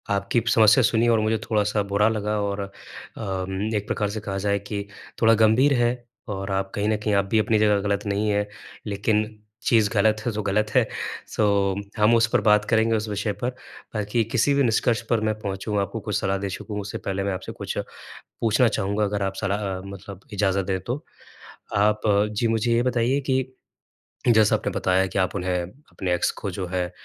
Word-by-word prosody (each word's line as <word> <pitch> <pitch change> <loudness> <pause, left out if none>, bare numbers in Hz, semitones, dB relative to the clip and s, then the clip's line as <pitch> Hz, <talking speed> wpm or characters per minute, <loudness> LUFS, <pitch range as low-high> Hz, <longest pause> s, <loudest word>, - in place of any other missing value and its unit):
आपकी 100 +4 0
समस्या 110 +2 +6
सुनी 115 +1 +3
और 115 -1 +4
मुझे 110 +1 +1
थोड़ा-सा 105 -1 +1
बुरा 105 +2 +4
लगा 105 -1 -1
और 100 0 -2
अम, 100 +1 -5
एक 105 +1 -2
प्रकार 105 -2 -1
से 110 +1 -4
कहा 95 -2 -4
जाए 100 0 +2
कि 100 -1 -3 0.3
थोड़ा 115 0 +6
गंभीर 130 +6 +5
है 120 - +3 0.4
और 95 0 -4
आप 95 0 -1
कहीं 105 +1 0
न 110 - +2
कहीं 105 0 -1
आप 100 - +2
भी 110 - +4
अपनी 110 0 +2
जगह 105 -1 +3
गलत 100 +1 -1
नहीं 100 +1 0
है। 105 0 +1 0.4
लेकिन 105 +1 +1 0.4
चीज़ 110 -3 +4
गलत 105 0 +2
हो 120 - +1
तो 105 - -3
गलत 105 +2 +1
है - - +4 0.4
सो 105 - 0 0.5
हम 105 +2 +4
उस 115 0 +4
पर - - +4
बात 105 0 +4
करेंगे 115 0 +3
उस 110 0 -2
विषय 105 +1 -1
पर। 125 - +2 0.5
बाकी 105 +2 0
किसी 125 +4 +3
भी 140 0 +3
निष्कर्ष 120 0 +2
पर 115 -2 +2
मैं 110 0 +1
पहुँचू 100 0 -4
आपको 100 +3 -2
कुछ 105 -1 -4
सलाह 95 -1 0
दे 100 0 -3
सकूँ 105 +2 -5
उससे 100 - -5
पहले 95 0 -3
मैं 100 -1 -1
आपसे 90 - -6
कुछ - - -5 0.6
पूछना 115 +2 +4
चाहूँगा 100 0 0
अगर 100 0 -1
आप 95 0 -2
सलाह 100 -2 -1
मतलब 100 -1 -9
इजाज़त 95 -2 +1
दें 95 -1 -1
तो? 125 +8 -4 0.7
आप 105 +1 +3 0.4
जी 115 - +2
मुझे 115 +1 +1
ये 120 +1 +3
बताइए 125 +2 +1
कि, 130 -1 -1 0.7
जैसा 110 -2 +5
आपने - - -2
बताया 95 +1 +2
कि 95 - -2
आप 95 +1 0
उन्हें 90 -2 -1
अपने 95 -3 -5
एक्स - - +1
को - - -3
जो 95 - -4
है 90 -1 -1
105 Hz, 200 wpm, -24 LUFS, 100-110 Hz, 0.7 s, समस्या